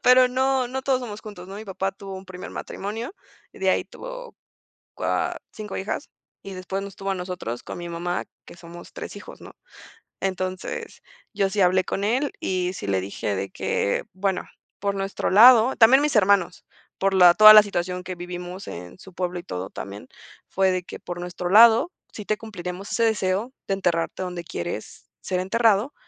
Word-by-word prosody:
Pero 255 0 +6
no, 260 0 +1
no 265 +2 -4
todos 260 -1 +1
somos 215 -4 -7
juntos, 190 -4 -10
¿no? 195 - -8
Mi 215 - -8
papá 195 -1 -3
tuvo 195 0 -9
un 190 0 -8
primer 185 -1 -8
matrimonio 225 - -6 0.4
y - - -15
de - - +2
ahí - - +1
tuvo - - -9 0.6
cua - - -1 0.2
5 210 -2 -7
hijas, 200 +9 -4 0.3
y 195 - -8
después 185 +1 -4
nos 200 -1 -8
tuvo 195 0 -3
a - - -1
nosotros 180 -10 -5
con - - -7
mi 175 0 -6
mamá, 175 +1 -2 0.2
que - - -13
somos 175 0 -12
3 - - -7
hijos, - - -12
¿no? - - -12 0.7
Entonces, 185 -1 -4 0.3
yo 195 -2 +1
sí 205 +1 -3
hablé 185 +1 +4
con 195 - -3
él 260 +7 +1
y 180 -1 -1
sí 135 - -7
le 95 -1 +1
dije 100 +1 -3
de 95 0 -3
que: 100 - -1
"Bueno, 190 0 -1 0.4
por 200 0 -1
nuestro 195 0 -2
lado" 235 +4 +8
También 250 +4 +7
mis 295 -2 0
hermanos, 190 -4 +3 0.3
por 195 0 +1
la 180 -2 +8
toda 215 +2 +10
la 215 0 +10
situación 180 -2 -3
que 185 0 -6
vivimos 180 +2 -7
en 90 - -8
su 190 - -14
pueblo 180 0 -3
y - - -10
todo 95 - -5
también, 100 +2 -8 0.4
fue 190 -1 +2
de 185 0 -1
que: - - -9
"Por 175 0 -7
nuestro 180 0 -4
lado, 230 - +7 0.2
sí 210 - -7
te 215 +1 0
cumpliriamos 190 -3 -7
ese 230 - +1
deseo 210 +1 0 0.2
de 195 - 0
enterrarte 175 -1 -1
donde 180 -1 -5
quieres 85 - -6
ser 185 -1 -2
enterrado, 225 +5 +2
190 Hz, 190 wpm, -24 LUFS, 180-215 Hz, 0.7 s, toda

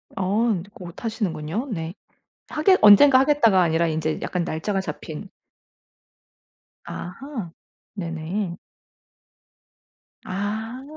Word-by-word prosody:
아 210 +4 +1 0.2
곧 180 -8 -10
하시는군요. 210 - -3
네. 165 -2 -4 0.6
하겠 370 +5 +4
언젠가 260 +6 +8
하겠다가 265 -9 +4
아니라 165 0 +2
인제 155 0 -1
약간 180 -2 -2
날짜가 190 +5 -2
잡힌. 160 +2 -7 1.6
아하. 205 - -7 0.4
네네. 170 +1 -4 1.7
아. 220 +6 -4
195 Hz, 185 characters per minute, -23 LUFS, 170-225 Hz, 1.7 s, 언젠가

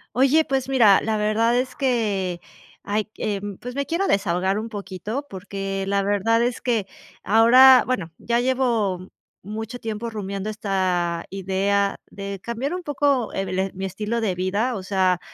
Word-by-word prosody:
Oye, 275 +5 +4
pues 265 -2 -1
mira, 230 -8 +5
la 220 0 -1
verdad 215 +3 +2
es 255 0 -2
que 205 -9 -1 0.4
Ay, 210 +1 -1
q 215 - -43
eh, 205 -2 -2 0.2
pues, 250 +1 -7
me 280 - -1
quiero 345 +6 -1
desahogar 190 0 +1
un 220 - -4
poquito, 205 +5 -5
porque 195 0 -4
la 200 0 +1
verdad 205 +3 +2
es 245 0 -1
que 230 -5 0 0.4
ahora 250 +4 +7
bueno, 190 -10 -2
ya 235 0 0
llevo 230 -8 0 0.4
mucho 220 +4 -6
tiempo 225 +1 -4
rumiando 200 -2 -4
esta 185 -5 -1
idea 195 +1 0
de 200 -1 -7
cambiar 240 +6 -3
un 360 0 -4
poco 280 -5 +1
el 190 0 -2
mi 190 +1 -4
estilo 210 +5 -3
de 210 -5 -1
vida. 200 +7 -1
O 195 - -5
sea, 185 -2 +1
210 Hz, 160 wpm, -23 LUFS, 195-245 Hz, 0.4 s, ahora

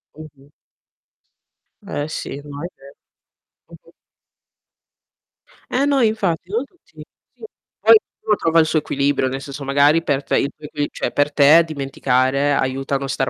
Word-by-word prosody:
Mh-mh. 145 -2 -14 1.4
Eh 145 +1 -4
sì, 145 -2 -6
no 145 +1 -8
è - - -3
ve 140 0 -16 0.7
Mh-mh. - - -17 1.8
Eh 260 - +1
no, 280 -1 +2
infatti 195 -7 0
non 230 +6 -1
tutti. 355 +8 -17 0.3
Sì, - - -21 0.4
poi - - +7 0.2
ognuno 210 -1 0
trova 165 0 +2
il - - +2
suo 160 0 +1
equilibrio, 140 -2 0
nel 135 +1 -4
senso 140 0 -8
magari 145 +4 +3
per 145 -4 -1
te - - 0
il 140 - -1
tuo 150 - -13
equi 145 0 -3
cioè - - -4
per 145 0 0
te 150 +4 +6
dimenticare 140 -1 0
aiuta 135 +1 -1
a - - +2
non 135 - -5
star 135 -1 -1
145 Hz, 160 wpm, -20 LUFS, 140-165 Hz, 1.8 s, poi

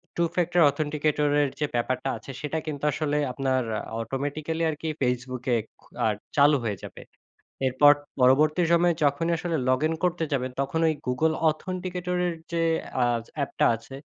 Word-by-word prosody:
two 170 0 +2
factor 175 0 +2
authenticator 150 0 0
এর 145 - +1
যে 150 - +1
ব্যাপারটা 130 +2 -1
আছে 135 - -10
সেটা 150 +2 -2
কিন্তু 145 -2 -5
আসলে 150 -1 -1
আপনার 130 -1 0 0.4
অটোমেটিক্যালি 145 +7 -3
আর 155 - -2
কি 160 - -2
ফেসবুকে 125 0 -1 0.3
খু - - -22 0.5
চালু 145 0 +6
হয়ে 105 -3 -2
যাবে। - - -9 0.7
এরপর 145 +3 +6 0.3
পরবর্তী 150 +6 +4
সময়ে 170 0 +4
যখনই 155 +4 +2
আসলে 165 -1 -2
লগইন 155 +5 +2
করতে 175 -2 +1
যাবেন 130 -2 -1
তখন 150 +4 -1
ঐ - - +4 0.2
গুগল 155 +6 +2 0.2
অথেন্টিকেটরের 180 +1 -2 0.2
যে 170 0 0 0.4
আ - - +4 0.3
অ্যাপটা 140 -1 0
আছে। 115 +4 -11
150 Hz, 150 wpm, -26 LUFS, 130-165 Hz, 0.7 s, চালু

